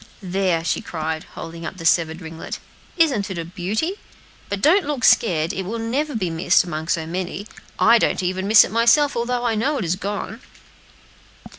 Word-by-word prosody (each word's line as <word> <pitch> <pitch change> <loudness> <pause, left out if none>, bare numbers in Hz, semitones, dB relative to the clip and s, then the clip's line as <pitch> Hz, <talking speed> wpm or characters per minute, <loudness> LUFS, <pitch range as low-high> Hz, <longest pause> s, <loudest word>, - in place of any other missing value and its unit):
"There," 185 -3 0
she - - 0
cried, 160 -1 -4
holding 165 0 -8
up 185 - -6
the 165 - -8
severed 165 0 +2
ringlet, 160 0 -7 0.4
"isn't 270 - +2
it 190 - -5
a 165 - -4
beauty? 210 - -3 0.5
but 200 - -2
don't 360 - +4
look 285 -4 -3
scared, 165 -7 +3
it 195 - -3
will 215 +5 -4
never 260 +6 -2
be 185 -6 -1
missed 165 +2 +3
among 160 -2 -5
so 165 -1 0
many; 185 +4 -4 0.3
I 230 +1 +5
don't 190 - 0
even 185 +2 -2
miss 215 +1 +8
it - - -5
myself, 235 +6 +4
although 240 +1 -1
I 235 - +1
know 265 +7 0
it 220 - -2
is 170 +2 0
gone." 205 +4 -5
195 Hz, 185 wpm, -21 LUFS, 170-235 Hz, 0.5 s, miss